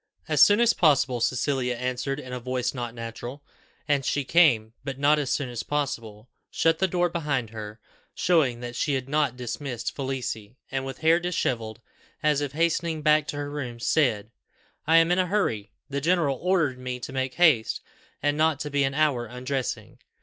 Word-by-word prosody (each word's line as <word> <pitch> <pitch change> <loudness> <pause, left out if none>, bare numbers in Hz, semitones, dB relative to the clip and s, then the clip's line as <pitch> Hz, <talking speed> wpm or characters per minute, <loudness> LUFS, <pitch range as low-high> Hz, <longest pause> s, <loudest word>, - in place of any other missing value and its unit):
"As 150 -2 +2
soon 205 +8 +7
as 235 -1 +5
possible," 135 -7 +3
Cecilia 125 0 0
answered 125 +3 -2
in 130 -3 -8
a 125 - -3
voice 125 0 -2
not 120 -2 -5
natural. 120 +4 -7 0.4
And 145 -2 +2
she 145 +2 0
came, 130 -8 +4
but 135 -1 -5
not 145 +2 +4
as 140 -3 -2
soon 140 - 0
as 120 -2 -4
possible 115 -7 -3 0.2
shut 165 0 +1
the 190 - +3
door 175 0 +1
behind 145 -9 -2
her, 110 0 -8 0.4
showing 140 -9 +2
that 120 0 -6
she 140 +3 0
had 130 -1 -3
not 145 -3 +1
dismissed 125 0 -4
Felicie, 125 -4 -4
and, 135 0 -2
with 135 - -6
hair 165 +2 +5
dishevelled, 120 -11 -2 0.4
as 150 -1 +3
if 145 -2 -3
hastening 165 0 0
back 150 0 +4
to 145 - -4
her 145 0 -4
room, 125 -5 -5
said, 115 -6 +1 0.6
"I 165 +1 +6
am 165 +1 +5
in 180 - +3
a 185 - +2
hurry; 115 - -1 0.2
the 140 0 -3
general 160 -4 +1
ordered 170 -8 +1
me 125 0 -4
to 130 - -7
make 130 -1 -2
haste, 150 -11 +4 0.4
and 145 0 +2
not 155 -2 +2
to 150 - -4
be 140 0 +2
an 135 0 -1
hour 140 -6 +1
undressing. 130 +2 -4
135 Hz, 185 wpm, -26 LUFS, 125-155 Hz, 0.6 s, soon